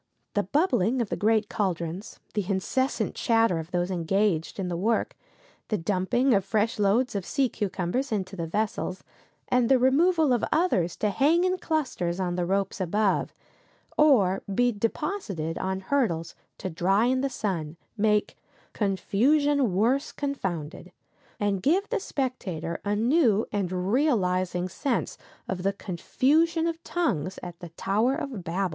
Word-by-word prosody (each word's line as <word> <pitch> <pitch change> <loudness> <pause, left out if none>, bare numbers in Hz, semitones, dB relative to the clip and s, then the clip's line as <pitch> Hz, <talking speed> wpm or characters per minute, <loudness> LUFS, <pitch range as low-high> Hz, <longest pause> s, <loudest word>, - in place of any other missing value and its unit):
The 205 - +2
bubbling 255 - +1
of 230 -4 -1
the - - -1
great 215 0 +2
caldrons, 185 0 -3
the 205 -3 -2
incessant 260 +8 0
chatter 225 -7 +2
of 160 +1 -7
those 180 +1 -1
engaged 180 -1 0
in 190 -2 -2
the 175 - -2
work, 220 +6 0 0.5
the 215 - 0
dumping 205 +9 +1
of 195 -2 +3
fresh 215 +3 0
loads 210 +6 +2
of 200 -2 -2
sea 270 +8 +1
cucumbers 205 +7 -2
into 195 -2 -2
the 170 -3 -4
vessels, 200 0 -2 0.4
and 250 -2 +2
the 265 - +6
removal 300 +3 +3
of 240 - 0
others 195 - +1
to 210 - 0
hang 310 - +3
in 370 0 +1
clusters 240 - -1
on 180 -2 -1
the 175 -1 -1
ropes 195 +1 -1
above, 200 +3 +1 0.6
or 210 -11 +4
be 245 +5 +3
deposited 210 - -3
on 190 0 -2
hurdles 190 -8 0 0.2
to 185 - -5
dry 195 +7 +2
in 255 +1 +2
the 275 - 0
sun, 175 - -3 0.2
make 210 -1 +1 0.4
"confusion 255 +6 +2
worse 235 +9 +1
confounded," 190 - -4 0.5
and 200 -2 0
give 365 - +2
the - - 0
spectator 190 - -3
a 205 +1 0
new 230 -2 +3
and 185 -2 -1
realizing 185 - +1
sense 245 +8 -2 0.3
of 185 -1 -3
the 195 +2 +1
confusion 305 - +1
of 330 0 -3
tongues 195 - -1
at 175 -1 -8
the 175 - -8
Tower 210 +10 0
of 275 - -5
Babel. 185 +3 -1
205 Hz, 150 wpm, -27 LUFS, 185-260 Hz, 0.6 s, the